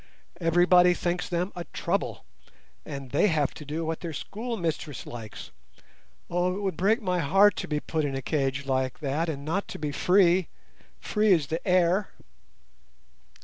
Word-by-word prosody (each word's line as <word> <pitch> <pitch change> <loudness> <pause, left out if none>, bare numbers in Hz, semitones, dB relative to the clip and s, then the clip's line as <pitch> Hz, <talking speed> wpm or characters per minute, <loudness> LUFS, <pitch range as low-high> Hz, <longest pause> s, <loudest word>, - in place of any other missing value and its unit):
Everybody 175 +1 +5
thinks 175 +1 -2
them 180 +2 -1
a 175 - -4
trouble, - - -3 0.6
and 135 -3 -7
they 145 - +3
have 150 -6 +1
to - - -9
do 155 +3 -4
what 160 0 -2
their 170 -2 -5
schoolmistress 175 - -4
likes. 115 -3 -9 0.8
Oh! 180 +1 0
it - - -5
would 190 -4 -1
break 215 - +2
my 180 -2 0
heart 195 +6 +5
to - - -3
be 150 -1 -1
put 155 +1 -2
in 140 -2 -2
a 135 - -3
cage 135 -2 -1
like 130 -1 -1
that 150 +4 -1
and 140 -2 -5
not 185 +6 -1
to - - -7
be 150 -1 -3
free—free 190 +4 +1
as 160 -5 +2
the 160 +7 -4
air." 185 +2 +3
170 Hz, 160 wpm, -27 LUFS, 145-185 Hz, 0.8 s, Everybody